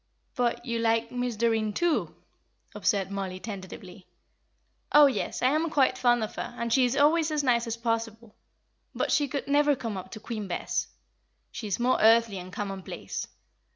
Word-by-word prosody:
"But 245 -1 -1
you 235 -1 -2
like 230 0 +1
Miss 245 -1 -2
Doreen, 220 -1 +1
too?" 345 +6 0 0.6
observed 195 -2 0
Mollie, 190 -2 -4
tentatively. 190 -2 -9 0.8
"Oh, 295 0 +8
yes, 270 -2 -1
I 255 - +5
am 315 +3 +1
quite 270 -4 +3
fond 240 -2 +2
of 215 - -5
her, - - -5
and 235 -1 -1
she 260 -2 +5
is 250 +3 -1
always 310 +2 +4
as 300 -1 0
nice 240 -3 +2
as 230 0 -3
possible. 230 -1 -3 0.6
But - - -1
she 290 -1 +2
could 275 +1 -4
never 290 0 +3
come 225 -5 -5
up 185 - -7
to 215 - -7
Queen 215 -2 -5
Bess; 175 - -2 0.6
she 220 - -6
is 200 - -2
more 250 +2 +2
earthly 225 -2 +4
and 180 +1 -9
commonplace. 195 -1 -5
230 Hz, 175 wpm, -27 LUFS, 210-260 Hz, 0.8 s, Oh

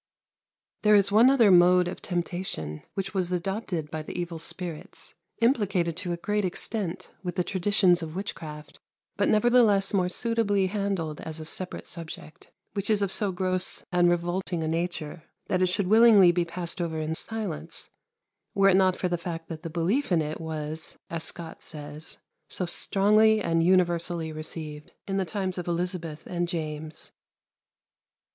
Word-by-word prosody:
There 210 0 +5
is 200 -1 +4
one 225 +5 +7
other 235 -7 +5
mode 180 0 +6
of 180 - -6
temptation 175 - -3
which 195 +1 -3
was 185 -2 -1
adopted 180 -3 -3
by 155 -1 -3
the 155 - -6
evil 170 -2 -4
spirits, 165 -1 -7 0.3
implicated 195 - +2
to 180 -1 -3
a 170 - -2
great 210 +4 -1
extent 190 0 -3
with 180 -2 -4
the 180 - +1
traditions 185 -1 +3
of 160 0 -6
witchcraft, 155 -6 -7 0.4
but - - +1
nevertheless 215 -3 +4
more 185 -2 +2
suitably 205 -2 +1
handled 190 -6 -2
as 160 0 -7
a 155 - -7
separate 180 +3 -5
subject, 165 0 -9 0.2
which 200 0 -2
is 210 -2 +3
of 195 - 0
so 205 -1 +5
gross 185 0 0
and 175 -1 +4
revolting 175 0 -1
a - - -2
nature 165 -1 -3 0.3
that 185 - +1
it 185 - +4
should 190 +2 0
willingly 215 -3 +7
be 175 0 0
passed 170 +1 -4
over 160 -2 -2
in 155 +1 -2
silence, 210 -2 -6 0.6
were 195 0 +5
it 185 - +5
not 185 -1 +4
for 180 - -1
the 175 -1 -1
fact 165 -1 -6
that 160 -2 -6
the 165 - -6
belief 180 - 0
in 175 - +4
it 155 +2 -5
was, 155 0 -5
as 165 -1 -3
Scot 170 0 -5
says, 150 0 -8 0.3
"so 180 - -2
stronglie 215 +4 +3
and 165 -4 +1
universallie 170 -2 +1
received" 155 -1 -8
in 195 0 -1
the 190 - 0
times 185 +1 -3
of 175 - -6
Elizabeth 170 -2 -3
and 175 -1 -2
James. 155 -2 -5
180 Hz, 165 wpm, -27 LUFS, 165-195 Hz, 0.6 s, one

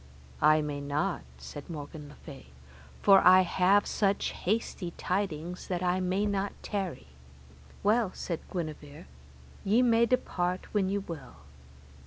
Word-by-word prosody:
I 155 +1 +5
may 145 -1 -4
not, 150 +6 -1 0.2
said 145 +1 -9
Morgan 150 -1 -7
le 145 - -13
Fay, 140 - -12 0.6
for 195 -1 +8
I 185 +1 +8
have 190 +3 +3
such 200 -1 0
hasty 185 -3 -2
tidings, 180 -2 -3
that 180 -1 -2
I 180 +1 +1
may 185 +3 0
not 200 -1 -1
tarry. 195 - -4 0.7
Well, 215 +1 +3
said 170 -3 -4
Guenever, 155 -5 -6 0.6
ye 220 +6 +3
may 235 -1 +4
depart 185 -7 -1
when 195 -3 +1
ye 200 - 0
will. 170 - -7
185 Hz, 135 wpm, -29 LUFS, 155-200 Hz, 0.7 s, for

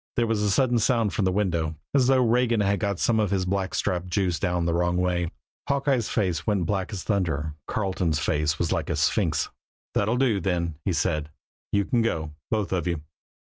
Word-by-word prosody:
There 120 - +2
was 110 -2 0
a 105 - +2
sudden 120 +3 +3
sound 115 -3 +2
from 100 - 0
the 95 - +2
window, 85 -5 0 0.2
as 130 -3 +4
though 130 -2 +4
Regan 120 -1 +2
had 100 0 +1
got 100 -3 -1
some 110 +4 +2
of 105 -2 +1
his 95 -2 0
blackstrap 95 -1 -1
juice 90 -2 0
down 90 -3 0
the 85 - +1
wrong 90 +1 +1
way. 90 -1 0 0.4
Hawkeye's 135 -4 +1
face 90 -7 -1
went 100 -5 +1
black 95 +2 -1
as 100 -4 -5
thunder. 80 -7 -1
Carleton's 95 -6 0
face 75 +2 0
was 85 - -1
like - - -1
a - - 0
sphinx. - - +1 0.4
"That'll 110 +4 +1
do, 125 -6 +2
then," 85 -2 -1
he 95 - +1
said. 75 -2 0 0.4
"You 100 -1 +2
can 120 +3 +1
go, 80 -9 -1 0.2
both 105 -3 -1
of 90 -1 -1
you." 85 -4 -2
95 Hz, 200 wpm, -26 LUFS, 85-110 Hz, 0.4 s, as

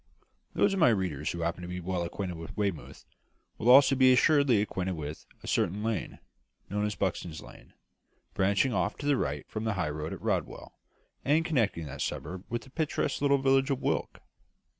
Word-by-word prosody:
Those 200 - +3
of 195 - -1
my 160 - +6
readers 95 -10 -1
who 85 - -5
happen 85 +1 -2
to 90 - -6
be 90 0 -5
well 90 0 -2
acquainted 90 +1 -4
with 80 -1 -9
Weymouth, 100 -6 -3 0.5
will 115 - +1
also 135 +1 +8
be 130 -1 +6
assuredly 140 -3 +4
acquainted 95 -3 -2
with 75 -2 -7 0.2
a - - -9
certain 100 +5 0
lane, 115 -2 -2 0.5
known 105 +1 0
as 105 - -4
Buxton's 85 -4 -2
Lane, - - -14 0.6
branching 100 +6 +2
off - - 0
to 145 - -7
the 145 -1 +3
right 75 - -2
from 110 - -5
the 110 -1 0
high 90 -6 -1
road 75 +1 -5
at - - -6
Rodwell, - - -2 0.5
and 155 +4 +2
connecting 110 - 0
that 70 -1 -7
suburb 95 +1 -4
with 120 0 -3
the 135 - -16
picturesque 155 -1 -1
little 140 -1 +4
village 135 0 +3
of 135 -2 0
Wyke. - - -2
105 Hz, 190 wpm, -29 LUFS, 85-135 Hz, 0.6 s, also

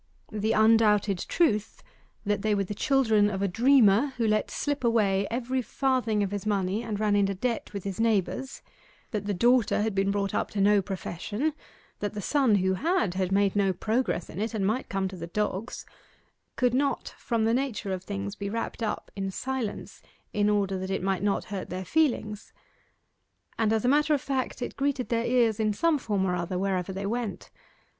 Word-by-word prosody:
The 215 +1 0
undoubted 215 -3 +4
truth, 215 -12 +1 0.4
that 205 0 0
they 215 0 +1
were 200 - +1
the 195 - -5
children 220 -4 +3
of 195 -1 -2
a - - +2
dreamer 245 +3 +4
who 235 - +1
let 215 0 +1
slip 290 -2 -2
away 200 -4 +2
every 255 +2 -1
farthing 250 -5 0
of 195 - -2
his 205 -1 -3
money 200 0 0
and 220 -3 -4
ran 210 -1 +2
into 200 -1 +2
debt 235 +4 -2
with 200 -3 -6
his 195 0 -5
neighbours 225 +4 0 0.5
that 210 -4 -3
the 205 - 0
daughter 235 0 +3
had 220 -1 -1
been 195 0 +1
brought 200 0 -1
up - - -1
to 205 - -4
no 205 +1 +4
profession 200 - -3 0.5
that 205 0 -3
the - - -3
son 260 +1 +2
who 190 -1 +2
had, 310 - 0
had 185 0 -1
made 200 0 +2
no 195 -2 +2
progress 220 -4 -1
in 185 - -6
it, 225 +1 -2
and 200 -3 0
might 220 +6 -1
come 195 -1 -1
to 190 - -7
the 165 -1 -6
dogs 210 +4 -3 0.7
could 250 -2 +2
not 275 0 0
from 230 -2 0
the 225 - +2
nature 240 -6 -1
of 185 -1 -5
things 200 0 -4
be 200 -1 -4
wrapped 230 +2 -4
up 220 - -3
in 195 -1 -2
silence 255 +1 -4 0.3
in 205 0 +2
order 195 -2 +1
that 190 0 -4
it 195 - -2
might 190 -1 0
not 200 0 0
hurt 190 - -4
their 185 +1 -5
feelings; 220 - 0 1.1
and 220 -1 +2
as 220 +1 +1
a - - +3
matter 295 +3 +4
of 280 - -3
fact, 260 -2 -2
it - - -5
greeted 275 -2 -1
their 230 0 0
ears 235 -3 +2
in 215 -1 +2
some 320 +6 +2
form 205 -6 -1
or 180 -1 0
other 175 +1 -3
wherever 190 -1 -1
they 195 +1 -4
went. 230 0 -4
210 Hz, 200 wpm, -27 LUFS, 195-240 Hz, 1.1 s, undoubted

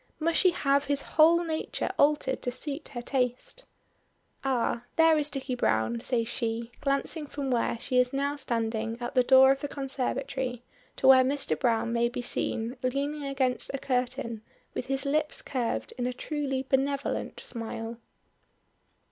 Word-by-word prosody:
Must 330 +1 +2
she 370 - +6
have 280 -5 +1
his 285 0 +1
whole 330 +2 +5
nature 320 -1 -2
altered 285 -3 +2
to 245 - -2
suit 285 +4 -4
her 240 - -4
taste? 255 - -2 0.8
"Ah, 245 -2 0
there 325 -1 +6
is 300 -1 +1
Dicky 270 -2 -4
Browne," 115 - +1
says 230 - 0
she, 230 0 -3
glancing 285 +2 0
from 280 -2 -4
where 235 -1 +1
she 250 0 +1
is 250 0 +3
now 280 +1 -1
standing 230 -4 -2
at 240 +2 -4
the 255 - +5
door 265 +1 +7
of 275 - 0
the 290 - -2
conservatory 265 -2 -3 0.3
to - - -3
where 260 -1 +8
Mr. 275 +2 0
Browne 230 -2 +1
may 235 0 +2
be 245 0 -5
seen 235 0 -2
leaning 280 +3 -1
against 265 -2 0
a - - -1
curtain 250 -4 -2 0.3
with - - -4
his 270 0 -1
lips 300 +2 0
curved 230 - -2
in 245 - 0
a 250 - -2
truly 270 -1 -3
benevolent 275 +1 -1
smile. 225 0 -6
265 Hz, 160 wpm, -28 LUFS, 240-280 Hz, 0.8 s, where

